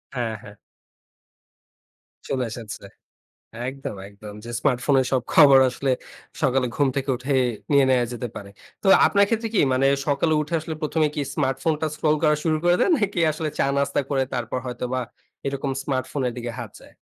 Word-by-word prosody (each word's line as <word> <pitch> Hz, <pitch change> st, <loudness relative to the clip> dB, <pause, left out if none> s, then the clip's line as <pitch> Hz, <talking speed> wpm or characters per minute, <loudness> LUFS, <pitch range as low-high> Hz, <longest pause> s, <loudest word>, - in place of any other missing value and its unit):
হ্যাঁ, 120 Hz, -3 st, -2 dB
হ্যাঁ। 105 Hz, -1 st, -11 dB, 1.7 s
চলে 130 Hz, -2 st, -1 dB
এসেছে। 110 Hz, -4 st, -8 dB, 0.9 s
একদম, 135 Hz, -6 st, -6 dB
একদম। 105 Hz, +1 st, -11 dB
যে 120 Hz, -, -7 dB
স্মার্টফোনের 130 Hz, -1 st, +2 dB
সব 130 Hz, -2 st, +2 dB
খবর 140 Hz, -4 st, +8 dB
আসলে 130 Hz, +2 st, -2 dB, 0.5 s
সকালে 135 Hz, -2 st, +2 dB
ঘুম 145 Hz, -2 st, +3 dB
থেকে 135 Hz, 0 st, -1 dB
উঠে 130 Hz, +3 st, -2 dB, 0.4 s
নিয়ে 140 Hz, -1 st, +6 dB
নেওয়া 125 Hz, -2 st, +3 dB
যেতে 120 Hz, 0 st, -4 dB
পারে। 100 Hz, -1 st, -8 dB, 0.3 s
তো -, -, -3 dB, 0.2 s
আপনার 200 Hz, 0 st, +4 dB
ক্ষেত্রে 225 Hz, 0 st, -1 dB
কি -, -, +4 dB
মানে, 130 Hz, +1 st, +3 dB, 0.2 s
সকালে 145 Hz, +3 st, +1 dB
উঠে 150 Hz, +3 st, -5 dB
আসলে 160 Hz, 0 st, -5 dB
১ম 155 Hz, +1 st, -1 dB
এ -, -, +1 dB
কি 145 Hz, -, 0 dB
স্মার্টফোনটা 150 Hz, +3 st, 0 dB
স্ক্রল 155 Hz, 0 st, +1 dB
করা 150 Hz, -1 st, +4 dB
শুরু 155 Hz, -2 st, +2 dB
করে 175 Hz, 0 st, +4 dB
দেন, -, -, +3 dB
নাকি 200 Hz, -5 st, -1 dB
আসলে 155 Hz, +1 st, -3 dB
চা-নাস্তা 140 Hz, 0 st, +1 dB
করে 135 Hz, -1 st, +2 dB
তারপর 120 Hz, +1 st, -2 dB
হয়তোবা 125 Hz, +1 st, -3 dB, 0.5 s
এরকম 140 Hz, 0 st, -2 dB
স্মার্টফোনের 130 Hz, -1 st, -2 dB
দিকে 120 Hz, 0 st, -4 dB
হাত 115 Hz, -4 st, -6 dB
যায়? -, -, -17 dB
135 Hz, 165 wpm, -23 LUFS, 125-150 Hz, 1.7 s, খবর